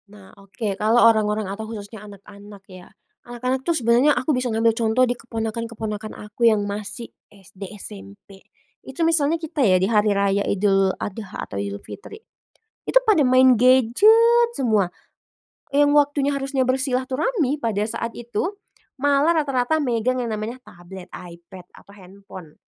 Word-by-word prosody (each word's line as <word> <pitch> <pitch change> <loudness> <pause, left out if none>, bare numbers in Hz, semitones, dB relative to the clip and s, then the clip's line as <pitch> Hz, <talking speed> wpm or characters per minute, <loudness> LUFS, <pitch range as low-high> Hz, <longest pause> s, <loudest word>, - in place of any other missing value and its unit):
Nah, 200 -2 -16
oke. 200 +1 -5
Kalau 220 +3 +3
orang-orang 215 -1 +2
atau 210 +3 -6
khususnya 210 -1 -9
anak-anak 200 0 -14
ya. 185 -2 -14 0.3
Anak-anak 250 +2 -3
tuh, 335 +3 -1
sebenarnya 245 +4 +3
aku 295 +4 0
bisa 250 -1 -1
ngambil 225 0 +2
contoh 225 +2 +1
di 245 - -1
keponakan-keponakan 225 -2 -6
aku 210 +3 +1
yang 210 -2 0
masih 205 +3 -6 0.2
SD, 195 -1 -12
SMP. 100 - -12 0.4
Itu 280 +5 -3
misalnya 325 -1 +2
kita 320 -2 -5
ya, 190 -7 +4
di 185 - +1
hari 210 0 +2
raya 200 0 +1
Idul 195 -1 +1
Adha 205 -1 -6
atau 100 - -5
Idul 100 0 -5
Fitri, 105 - -10 0.7
itu - - +5
pada 425 -9 +4
main 255 -1 +5
gadget 410 - +4
semua. 215 -8 +1 0.9
Yang 290 0 +4
waktunya 285 -1 +1
harusnya 275 -1 -2
bersilaturahmi 265 - -1
pada 225 -6 -2
saat 230 +1 -4
itu, 240 - -4 0.4
malah 285 +4 +2
rata-rata 275 +2 0
megang 250 0 -1
yang 235 - -4
namanya 220 +4 -5
tablet, 180 -1 -13
iPad 175 +1 -12
atau - - -18
handphone, 190 -4 -14
230 Hz, 145 wpm, -22 LUFS, 200-260 Hz, 0.9 s, itu